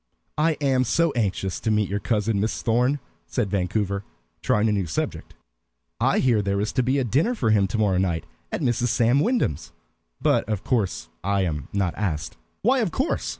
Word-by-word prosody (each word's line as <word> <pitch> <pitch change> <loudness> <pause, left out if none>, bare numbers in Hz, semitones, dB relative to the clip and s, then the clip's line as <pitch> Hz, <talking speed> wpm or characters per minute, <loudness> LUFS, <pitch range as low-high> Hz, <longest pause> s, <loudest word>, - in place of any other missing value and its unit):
"I 160 +1 +3
am 135 -2 +3
so 165 +6 +2
anxious 95 -6 -1
to - - -2
meet 105 -2 +2
your 100 +1 -2
cousin, 105 -1 0
Miss 110 +2 -1
Thorn," 125 +5 +2 0.3
said 100 - -1
Vancouver, 100 +1 -1 0.4
trying 105 +1 +2
a - - +2
new 100 -4 0
subject. 80 - -4 0.6
"I - - +2
hear 120 -5 +3
there 100 0 0
is 105 +1 -1
to 130 - +2
be 130 +3 +1
a 135 - +2
dinner 145 - +1
for 115 - +1
him 100 -2 +4
to 105 - -3
morrow 100 -4 +2
night 85 -4 0 0.3
at - - -2
Mrs. 120 -2 +1
Sam 120 +3 +3
Wyndham's. 220 - 0 0.5
But - - +1
of 105 -2 -2
course 100 - -1 0.2
I 100 +1 +1
am 75 -6 -2
not 95 -4 0
asked." 85 -8 -2 0.3
"Why 255 +5 +4
'of 220 -6 +1
course'?" 265 - -1
110 Hz, 195 wpm, -24 LUFS, 100-130 Hz, 0.6 s, him